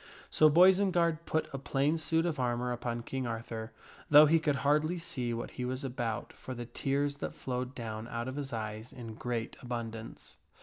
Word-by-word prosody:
So 155 Hz, -, +6 dB
Boisenard 175 Hz, -1 st, +4 dB
put 160 Hz, -, 0 dB
a 135 Hz, -, -3 dB
plain 140 Hz, +3 st, +1 dB
suit 160 Hz, +1 st, +1 dB
of 160 Hz, -5 st, -1 dB
armor 125 Hz, 0 st, 0 dB
upon 120 Hz, -1 st, -3 dB
King 130 Hz, 0 st, -3 dB
Arthur, 115 Hz, 0 st, -5 dB, 0.4 s
though 150 Hz, +1 st, +10 dB
he 160 Hz, +2 st, +4 dB
could 150 Hz, -2 st, +1 dB
hardly 150 Hz, +4 st, +3 dB
see 165 Hz, -8 st, -3 dB
what 115 Hz, 0 st, -4 dB
he 125 Hz, -, -5 dB
was 130 Hz, +2 st, -3 dB
about 120 Hz, -4 st, -3 dB
for 130 Hz, -, -7 dB
the 120 Hz, 0 st, -5 dB
tears 140 Hz, +3 st, -1 dB
that -, -, -5 dB
flowed 125 Hz, +1 st, -4 dB
down 110 Hz, -2 st, -5 dB
out 115 Hz, +1 st, -4 dB
of 130 Hz, -, -4 dB
his 145 Hz, -2 st, -4 dB
eyes 110 Hz, 0 st, -5 dB
in 115 Hz, -3 st, -8 dB
great 115 Hz, 0 st, -3 dB
abundance. 115 Hz, -2 st, -6 dB
130 Hz, 185 wpm, -32 LUFS, 120-150 Hz, 0.4 s, though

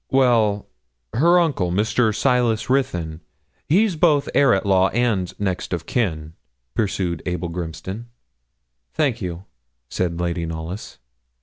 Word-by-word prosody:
'Well, 115 Hz, -6 st, +3 dB, 0.5 s
her 170 Hz, +8 st, +5 dB
uncle, 135 Hz, -, +1 dB
Mr. 110 Hz, +4 st, +2 dB
Silas 120 Hz, -2 st, +1 dB
Ruthyn. 85 Hz, -12 st, -1 dB, 0.5 s
He's 195 Hz, +4 st, +3 dB
both 155 Hz, -3 st, +3 dB
heir 140 Hz, -3 st, +5 dB
at 95 Hz, -, -2 dB
law 95 Hz, -1 st, +4 dB
and 110 Hz, -7 st, 0 dB
next 95 Hz, -2 st, -2 dB
of 85 Hz, -2 st, -3 dB
kin,' 80 Hz, -10 st, -2 dB, 0.4 s
pursued 95 Hz, -, -1 dB
Abel 90 Hz, -1 st, -2 dB
Grimston. 90 Hz, +6 st, -6 dB, 0.9 s
'Thank 130 Hz, -6 st, +1 dB
you,' 90 Hz, 0 st, -5 dB, 0.4 s
said 85 Hz, -2 st, -2 dB
Lady 85 Hz, -1 st, -1 dB
Knollys. 80 Hz, +5 st, -6 dB
100 Hz, 120 wpm, -22 LUFS, 85-125 Hz, 0.9 s, her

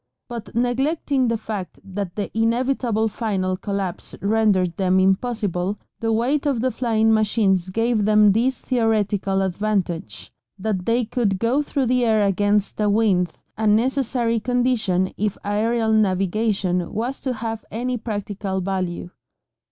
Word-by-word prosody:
But, 235 Hz, -3 st, -8 dB
neglecting 265 Hz, +2 st, +1 dB
the 230 Hz, 0 st, +1 dB
fact 205 Hz, -6 st, -6 dB
that 195 Hz, -2 st, -5 dB
the 205 Hz, 0 st, -4 dB
inevitable 230 Hz, -1 st, +1 dB
final 195 Hz, -4 st, -1 dB
collapse 195 Hz, -2 st, -4 dB
rendered 200 Hz, -4 st, +2 dB
them 185 Hz, 0 st, +2 dB
impossible, 195 Hz, -1 st, 0 dB, 0.2 s
the 225 Hz, 0 st, 0 dB
weight 265 Hz, +7 st, +1 dB
of 270 Hz, -5 st, +1 dB
the 260 Hz, +1 st, +1 dB
flying 225 Hz, -3 st, +2 dB
machines 205 Hz, -4 st, +2 dB
gave 225 Hz, +2 st, +1 dB
them 210 Hz, -1 st, +5 dB
this 245 Hz, +5 st, +1 dB
theoretical 210 Hz, -5 st, +1 dB
advantage, 185 Hz, -, -2 dB, 0.2 s
that 195 Hz, -2 st, -2 dB
they 235 Hz, +1 st, +2 dB
could 215 Hz, -4 st, 0 dB
go 235 Hz, +8 st, +1 dB
through 280 Hz, -2 st, -1 dB
the 250 Hz, 0 st, +2 dB
air 220 Hz, -3 st, +3 dB
against 205 Hz, +2 st, +1 dB
a 210 Hz, -, +3 dB
wind, 200 Hz, -5 st, +2 dB, 0.3 s
a 220 Hz, -, +1 dB
necessary 235 Hz, +1 st, +1 dB
condition 235 Hz, -6 st, +1 dB
if 210 Hz, -1 st, -1 dB
aerial 220 Hz, +2 st, +1 dB
navigation 195 Hz, -2 st, +1 dB
was 240 Hz, +5 st, -3 dB
to 260 Hz, -, -2 dB
have 225 Hz, -1 st, -4 dB
any 250 Hz, +3 st, -2 dB
practical 205 Hz, -4 st, -3 dB
value. 185 Hz, -2 st, -3 dB
215 Hz, 135 wpm, -22 LUFS, 195-235 Hz, 0.3 s, them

